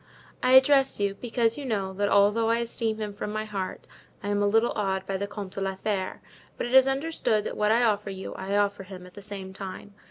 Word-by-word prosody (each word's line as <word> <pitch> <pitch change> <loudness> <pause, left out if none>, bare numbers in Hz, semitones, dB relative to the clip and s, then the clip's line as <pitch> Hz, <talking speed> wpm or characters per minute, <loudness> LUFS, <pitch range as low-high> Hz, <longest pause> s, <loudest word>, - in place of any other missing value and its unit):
"I 255 - +3
address 270 -1 +6
you, 200 -1 +1
because 230 +2 0
you - - -5
know, 200 -7 -2
that 205 +1 0
although 210 +3 +4
I 230 - +3
esteem 230 -1 -2
him 210 -2 -4
from 205 +1 -5
my 215 0 -3
heart 195 -3 -5 0.4
I 205 - -3
am 205 0 +1
a 205 - +3
little 225 +3 +3
awed 190 -2 -1
by 195 - -3
the 200 +1 -2
Comte 200 -2 -7
de 195 - -5
la 195 0 -1
Fere; 190 -1 -3 0.4
but - - -2
it 240 - -4
is 265 0 +7
understood 270 -6 0
that - - -4
what 210 0 +2
I 235 +2 +4
offer 210 -3 +1
you 190 -1 -6
I 195 +2 -2
offer 205 -1 +1
him 185 -1 -10
at 180 - -14
the 205 - -10
same 195 -2 -7
time. 195 +1 -8
205 Hz, 245 wpm, -27 LUFS, 195-230 Hz, 0.4 s, is